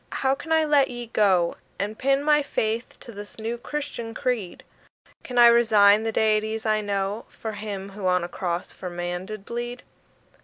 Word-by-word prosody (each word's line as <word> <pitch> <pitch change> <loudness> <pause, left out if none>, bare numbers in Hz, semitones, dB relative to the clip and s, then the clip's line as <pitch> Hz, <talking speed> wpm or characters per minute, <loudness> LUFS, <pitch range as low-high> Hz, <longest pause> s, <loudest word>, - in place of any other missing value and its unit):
how 265 0 +4
can 285 +4 -7
I 320 -1 +4
let 290 -2 +4
ye 240 -1 -6
go 195 -6 +2 0.2
And 210 +2 -3
pin 275 +4 +1
my 295 0 +4
faith 230 -4 -2
to 235 - -9
this 205 -1 -9
new 225 +1 -3
Christian 240 -5 -5
creed? 225 -8 -2 0.6
Can 250 - -6
I 240 - +9
resign 220 -3 +6
the 225 0 -1
deities 220 0 +1
I 215 -1 +2
know 200 +1 -2
For 220 - -6
him 205 -2 -6
who 195 -1 -4
on 180 -1 +2
a - - -3
cross 175 -1 -3
for 180 - -7
man 175 +1 -4
did 215 -2 -7
bleed? 240 +1 -5
220 Hz, 185 wpm, -25 LUFS, 200-240 Hz, 0.6 s, I